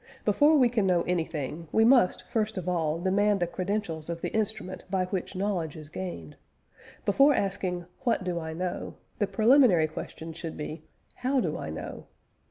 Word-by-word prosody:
Before 300 +2 +5
we 255 -3 +6
can 225 -5 +1
know 175 -2 +3
anything, 165 -2 -3
we 220 - +4
must 240 -6 +4
first 220 -2 -1
of 180 -1 -4
all 165 -3 0
demand 200 +3 +2
the 175 - +2
credentials 180 -3 -3
of 170 0 -3
the - - -3
instrument 215 -4 -2
by 185 -1 +1
which 185 +1 -4
knowledge 185 -5 -1
is 155 -2 -10
gained. 155 - -6 0.7
Before 275 +8 +5
asking, 185 -3 -1
What 235 -5 0
do 180 -2 -2
I 160 -1 -5
know? 180 +2 -4 0.2
the 205 - +2
preliminary 215 - +5
question 160 +1 -7
should 165 0 -6
be, 155 +1 -5 0.4
How 260 +2 +1
do 165 -10 -1
I - - -5
know? 80 - -7
185 Hz, 175 wpm, -28 LUFS, 165-215 Hz, 0.7 s, we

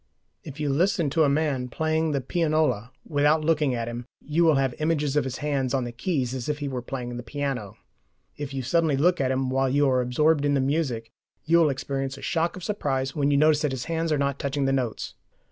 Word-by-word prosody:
If 145 0 -9
you 150 -1 -1
listen 170 +1 +1
to 160 +1 +3
a - - +3
man 140 -3 0
playing 160 +4 0
the 140 -2 0
pianola 155 - 0
without 150 +1 +2
looking 150 -5 +2
at 115 -1 -3
him, 120 +1 -6 0.2
you 155 +4 +2
will 160 -3 +5
have 135 -2 +1
images 150 -2 0
of 150 - +2
his 130 -1 -4
hands 135 -3 0
on 130 - 0
the 120 - -4
keys 130 -1 -2
as 130 +1 -4
if 150 - 0
he 145 -1 -4
were 130 -2 -3
playing 120 -1 -5
the - - -4
piano; 125 -4 -4 0.6
if 145 -2 -6
you 135 -1 -3
suddenly 155 +2 +2
look 175 +3 +3
at 130 - +1
him 130 0 0
while 135 0 +1
you 145 +2 +3
are 130 -1 +3
absorbed 145 +5 +2
in 145 0 +2
the - - +2
music, 130 -5 -1 0.3
you 170 +1 +4
will 160 -3 +4
experience 135 0 -3
a - - -11
shock 165 +1 0
of 185 - -9
surprise 135 -10 -2
when 145 -2 +1
you 140 - +3
notice 150 0 +4
that 150 -3 0
his 125 -2 -4
hands 165 -1 -1
are 150 - +2
not 140 -1 -1
touching 140 0 -1
the 135 - +2
notes. 125 -5 -2
140 Hz, 235 wpm, -25 LUFS, 130-155 Hz, 0.6 s, will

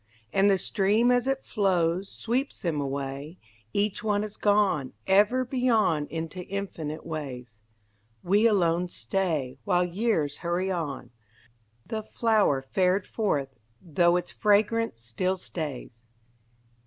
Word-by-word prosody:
And 195 +1 +4
the 195 - +4
stream 210 +5 +2
as 245 0 +2
it 270 0 -1
flows 185 -3 +1
Sweeps 255 +5 -2
them 160 -5 0
away, 140 +3 -4 0.3
Each 205 0 -1
one 210 -1 +1
is 215 -1 -6
gone 200 -10 +2
Ever 210 +7 +4
beyond 230 - +1
into 165 +2 -5
infinite 170 -6 -5
ways. 130 -8 -6 0.6
We 205 +5 +4
alone 180 -4 +2
stay 160 -9 -2
While 180 -3 +2
years 175 -6 0
hurry 175 +2 -1
on, 145 -8 -4 0.7
The 220 -1 -3
flower 215 - +1
fared 185 +6 +1
forth, 145 - -1 0.3
though 175 0 +2
its 180 - -4
fragrance 210 - +1
still 185 +12 -1
stays. 145 -10 -6
185 Hz, 120 wpm, -27 LUFS, 150-210 Hz, 0.7 s, And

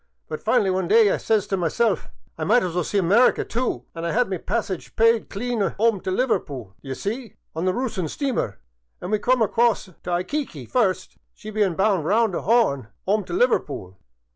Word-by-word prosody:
But - - -5
finally 205 -6 +2
one 185 -1 -1
day 220 -1 +5
I - - +1
says 215 -3 +1
t' 195 - -1
myself, 190 +4 0 0.2
* - - -39
I - - -1
might 240 +4 +4
as 180 -2 -2
well 180 0 0
see 205 - -2
America, 200 +7 +4
too.* 245 +2 -2
An* 165 - -6
I 170 - -1
*ad 235 +2 +1
my 190 - 0
passage 190 -1 -3
pyde 230 0 +3
clean 220 -1 -2
*ome 225 -1 +2
t' - - -4
Liverpool, 150 - -1
d'ye 135 -1 -5
see, 225 - -5 0.2
on 165 +3 -2
the 185 - +3
Roossian 205 -7 -2
steamer, 255 - -2 0.4
an' 180 - -6
we 215 - +2
come 245 +2 +3
across 230 +1 +2
t' 185 - -17
Ayqmqut 180 - -3
first, 190 -7 0 0.2
she 215 - -9
bein' 205 -5 +1
bound 195 -4 +2
round 220 +2 +2
the - - -1
'Orn 200 - +2 0.2
*ome 210 +2 +2
t' 175 - -7
Liver 245 +7 +4
pool. 95 - -9
200 Hz, 205 wpm, -23 LUFS, 175-230 Hz, 0.4 s, day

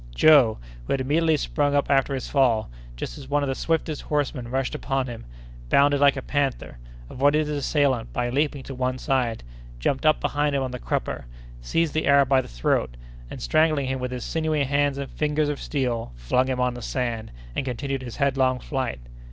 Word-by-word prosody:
Joe, 135 - +6 0.3
who - - 0
had 135 - 0
immediately 155 +4 +2
sprung 145 0 0
up 140 - +2
after 135 0 +2
his 130 - -4
fall, 120 - +2 0.2
just - - -6
as 135 -1 -11
one 145 0 +1
of 140 - -1
the - - +1
swiftest 160 +1 -1
horsemen 140 -5 -2
rushed 130 +1 -1
upon 135 -1 -1
him, 120 -3 -8 0.4
bounded 145 0 +4
like 140 -1 +5
a 135 - -4
panther, 140 - -2 0.3
avoided 145 - +2
his 150 0 -2
assailant 140 -4 +1
by 120 0 -1
leaping 145 0 0
to 135 - -7
one 130 0 -1
side, 125 - -1 0.3
jumped 130 - -1
up 155 0 +4
behind 145 0 0
him 135 - +1
on 130 - -3
the 125 - -5
crupper, - - -3 0.4
seized 160 - 0
the 155 - 0
Arab 140 -1 +5
by 135 -1 +4
the - - -11
throat, - - -1 0.3
and, - - -7
strangling 155 - +2
him 130 0 -2
with 125 0 -3
his 125 -2 -5
sinewy 155 -2 0
hands 140 0 +1
and 140 -1 -5
fingers 150 0 0
of 145 - -3
steel, 120 - -2
flung - - +1
him 130 -1 -1
on 125 0 +1
the 120 - -8
sand, 120 -3 -3 0.2
and - - -1
continued 135 +1 -3
his 120 -3 -7
headlong 130 -2 +2
flight. 130 - -3
135 Hz, 200 wpm, -24 LUFS, 125-145 Hz, 0.4 s, Joe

